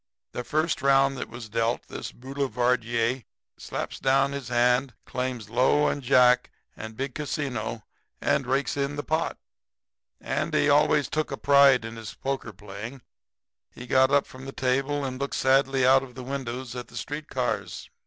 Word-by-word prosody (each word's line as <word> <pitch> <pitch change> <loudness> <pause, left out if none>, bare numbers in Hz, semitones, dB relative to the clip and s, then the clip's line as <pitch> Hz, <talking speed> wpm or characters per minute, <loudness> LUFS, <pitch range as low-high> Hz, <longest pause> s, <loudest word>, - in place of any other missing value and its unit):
"The 125 - -4
first 155 +5 0
round 135 0 +4
that - - -5
was 120 -1 -8
dealt, 115 +2 -1
this - - -6
boulevardier 125 -2 -1 0.3
slaps - - -5
down 135 +1 +3
his 140 -3 -5
hand, 125 +1 +2
claims 125 -4 -3
low 130 +5 +3
and 145 - -3
jack 125 -1 +4 0.3
and 110 0 -8
big 135 0 -3
casino 130 -7 -3 0.4
and 135 - +1
rakes 135 +2 0
in 140 0 -1
the 145 - -4
pot. 160 +2 -1 0.8
"Andy - - 0
always - - +4
took 155 0 -1
a - - -3
pride 140 -4 +5
in 115 0 -7
his 110 -1 -8
poker 135 -4 -3
playing. 105 +6 -9 0.7
He 120 - -10
got 130 +1 +4
up 140 0 +3
from 130 +1 -12
the - - -5
table 135 +2 0
and 130 0 -5
looked 140 - -2
sadly 135 0 +3
out 135 +1 +6
of 130 -2 -11
the 130 - -7
window 130 -2 -4
at 125 -1 -6
the - - -11
street 150 +1 -5
cars. - - -3
130 Hz, 165 wpm, -26 LUFS, 120-140 Hz, 0.8 s, out